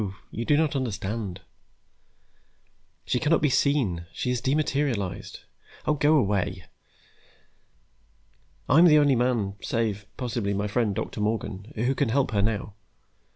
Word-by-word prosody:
You 115 - -4
do 145 - +3
not 155 -2 +1
understand. 105 -6 -3 1.6
She 125 - 0
cannot 155 +3 +3
be 150 - +3
seen, 125 - +1
she 125 - -3
has 125 -2 -1
dematerialized. 135 -8 -1 0.4
Oh, - - +2
go 150 +1 +3
away. 100 - 0 2.0
I'm 160 +7 +6
the 155 -3 +7
only 145 -2 +4
man, 115 -5 0
save, 105 -3 -2
possibly, 115 -5 -2
my 100 +1 -1
friend 105 -1 0
Doctor 110 -1 -4
Morgan, 105 -1 -3
who 120 +4 +1
can 135 -2 0
help 135 +3 +1
her 100 -3 +1
now. 105 -1 -1
115 Hz, 130 wpm, -26 LUFS, 100-140 Hz, 2.0 s, the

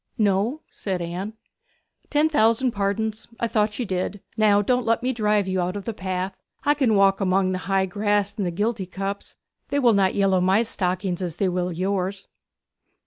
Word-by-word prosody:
'No,' 210 +7 +1
said 190 -3 -3
Anne. 175 +5 -4 0.8
'Ten 300 +1 +3
thousand 240 -3 +3
pardons. 215 +1 -2
I 235 - +1
thought 210 -1 0
you 245 - -2
did. 190 +1 -2 0.2
Now 210 -2 +4
don't 250 +3 +1
let 230 +1 +1
me 255 +1 +1
drive 210 -3 +1
you 185 -1 0
out 180 +2 -2
of 200 - -5
the 230 - -3
path. 185 -1 -3 0.3
I 290 - +4
can 260 -7 +2
walk 195 0 +4
among 190 0 +2
the 185 - -2
high 195 0 +3
grass 205 +1 0
and 200 -4 -1
giltycups 200 -2 -3 0.3
they 285 - 0
will 245 -5 +4
not 195 -2 +2
yellow 195 -2 +3
my 190 +5 +3
stockings 185 -3 -1
as 175 -4 -3
they 190 +1 +1
will 180 0 -1
yours. 190 +2 -2
200 Hz, 180 wpm, -24 LUFS, 185-220 Hz, 0.8 s, Now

